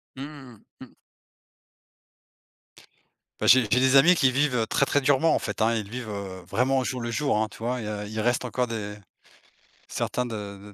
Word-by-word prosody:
Mmh 135 - -7
mmh 135 -7 -13 0.2
mh. - - -9
Mmh. - - -25 2.5
Bah, - - -1
j'ai 130 0 +8
j'ai 115 +4 +1
des 130 +1 +3
amis 165 +7 +7
qui 130 -5 +3
vivent, 140 -1 +1
heu, 110 -2 0
très, 140 - +2
très 145 - +1
durement 145 +3 +3
en - - +2
fait, - - -5
hein, 115 +1 +2
ils 105 -3 -3
vivent, 120 -1 -6
heu, 95 -2 -6
vraiment 130 +3 +1
au 130 - +1
jour 125 -1 -3
le 120 - -4
jour, 140 +1 0
hein, 110 - 0
tu - - -14
vois? 125 +2 -2
Il - - -6
y - - -5
a 105 -1 -4
il 110 +1 -6
reste 120 +3 0
encore 125 +1 -1
des 105 -3 -5 0.9
certains 125 - -2
de 105 -2 -8
120 Hz, 210 wpm, -25 LUFS, 110-130 Hz, 2.5 s, j'ai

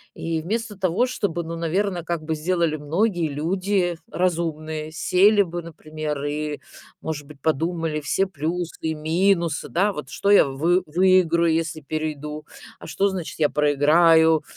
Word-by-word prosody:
И 165 -1 -3
вместо 215 +4 -3
того, 190 +5 +1
чтобы, 195 -9 -2
ну, 165 +1 -6
наверно, 180 +4 0
как 170 -2 -3
бы 160 +1 -2
сделали 170 0 0
многие 170 +3 0
люди 175 +4 -1
разумные, 160 -3 -2
сели 200 +6 +4
бы, 175 -1 -5
например, 155 -3 -6
и, 150 0 -3 0.4
может 150 -3 -5
быть, 150 -2 -14
подумали 160 +1 -1
все 190 +6 +1
плюсы 170 0 -4
и 160 0 -2
минусы, 170 +1 +1
да, 200 +4 +1
вот 150 - -7
что 200 - 0
я 205 - +7
вы 165 +7 +1
выиграю, 170 -1 +3
если 160 -1 -2
перейду, 150 0 -5 0.3
а - - -10
что, 200 +1 +1
значит, 185 -4 -5
я 150 - +3
проиграю. 160 +2 +4
165 Hz, 150 wpm, -23 LUFS, 155-180 Hz, 0.4 s, я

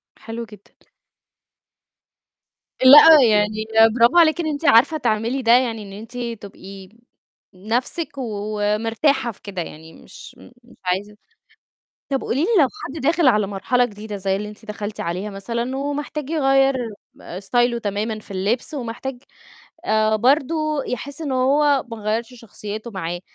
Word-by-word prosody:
حلو 230 +1 -7
جدًا. 210 -2 -17 2.1
لأ، 295 +3 +9
يعني 210 0 +3 0.5
برافو 240 +8 +4
عليكِ 330 0 +5
إن 315 - -3
أنتِ 305 +1 -4
عارفة 280 +8 +5
تعملي 235 0 -1
ده، 230 -1 +2
يعني 235 -3 +2
إن 200 - -11
أنتِ 225 +4 -10 0.2
تبقي 195 -1 -11 0.6
نَفسِك 235 - -2
ومرتاحة 225 +4 -1
في - - -20
كده، 195 -3 -6
يعني 160 0 -10
مش - - -14 0.3
مش 240 - -20
عايزة 200 +3 -2 0.9
طب 270 -1 -1
قولي 270 +5 -1
لي 345 - +1
لو 275 - +4 0.2
حد 280 +4 -7
داخل 320 +1 +2
على 210 -4 +3
مرحلة 245 +6 0
جديدة 210 -1 -8
زي 190 0 -1
اللي 210 +1 -5
أنتِ 215 +1 -14
دخلتِ 210 0 -6
عليها 180 +5 -3
مثلًا، 235 +6 -4
ومحتاج 290 +1 -4
يغيّر 270 -3 +3 0.5
آآ، 180 - -8
ستايله 240 +4 +1
تمامًا 215 +1 -3
في 205 - -15
اللبس، 210 - -2
ومحتاج، 250 0 -6 0.6
آآ، 215 0 +2
برضو 300 +4 +1
يحس 275 +5 -6
إن 285 -4 -3
هو 280 +2 +2
ما 230 - -6
غيّرش 225 +3 -3
شخصيته 215 0 -8
معاه، 175 -3 -5
230 Hz, 140 wpm, -21 LUFS, 210-270 Hz, 2.1 s, لأ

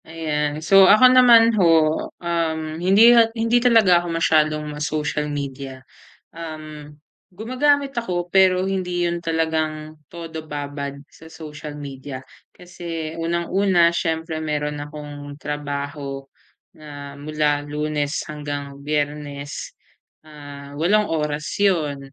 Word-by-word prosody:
Ayan. 155 -1 -3
So, 195 0 +7
ako 250 +5 +7
naman 235 -2 +7
ho, 160 -2 +3
um, 165 -2 -1 0.2
hindi 205 +6 +6 0.2
hindi 230 +2 +2
talaga 220 -8 +5
ako 175 - -7
masyadong 155 -2 +2
ma-social 150 0 -2
media. 135 -2 -6 0.5
Um, 155 -2 -8 0.4
gumagamit 270 +7 0
ako, 180 -7 -2
pero 190 0 +3
hindi 180 -2 -1
'yon 170 0 -4
talagang 155 -1 -2 0.2
todo 165 -2 -7
babad 145 -2 -6
sa 160 0 -16
social 150 -1 -9
media, 135 -1 -7 0.3
kasi 170 -3 -7
unang 170 +1 -2
una 190 -3 +3
siyempre 160 -1 -2
mayro'n 150 -1 -3
akong 145 -1 -9
trabaho 145 -1 -5 0.6
na 145 -2 -10
mula 145 0 -1
Lunes 150 0 -2 0.2
hanggang 145 -2 -6
Biyernes, 145 -1 -4 0.6
ah, 145 -1 -11
8 205 +7 +2
oras 150 -1 -2
'yon, 150 -9 0
155 Hz, 110 wpm, -21 LUFS, 145-175 Hz, 0.6 s, So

